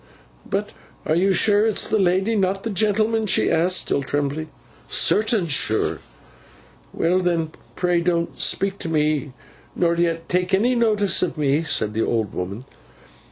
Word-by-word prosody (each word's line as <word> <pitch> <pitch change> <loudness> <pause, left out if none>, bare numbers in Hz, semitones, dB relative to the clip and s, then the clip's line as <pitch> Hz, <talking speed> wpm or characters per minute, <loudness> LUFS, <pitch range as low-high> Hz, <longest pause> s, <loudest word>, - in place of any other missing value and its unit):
'But - - -2 0.3
are - - +1
you 185 +4 +2
sure 205 +3 +3
it's 220 - +1
the 215 - +1
lady, 190 +3 +1
and 215 -3 +1
not 195 +1 -1
the 225 - -3
gentleman?' 215 +2 +1
she - - +2
asked, 180 +3 +2
still - - 0
trembling. 145 +3 -2 0.4
'Certain 215 -3 +2
sure!' 135 -8 0 0.9
'Well 175 +3 +1
then, 170 -3 -1 0.2
pray 175 -1 +1
don't 170 -1 -1
speak 195 0 0
to 165 - -5
me, 150 -3 0 0.4
nor 170 -1 +1
yet 170 -1 -1
take 180 +1 +1
any 235 +6 +2
notice 215 -5 +2
of 175 -3 -2
me,' 145 0 +1
said 110 -9 -1
the 110 - 0
old 110 -4 -1
woman. 100 +7 -5
175 Hz, 160 wpm, -22 LUFS, 155-200 Hz, 0.9 s, sure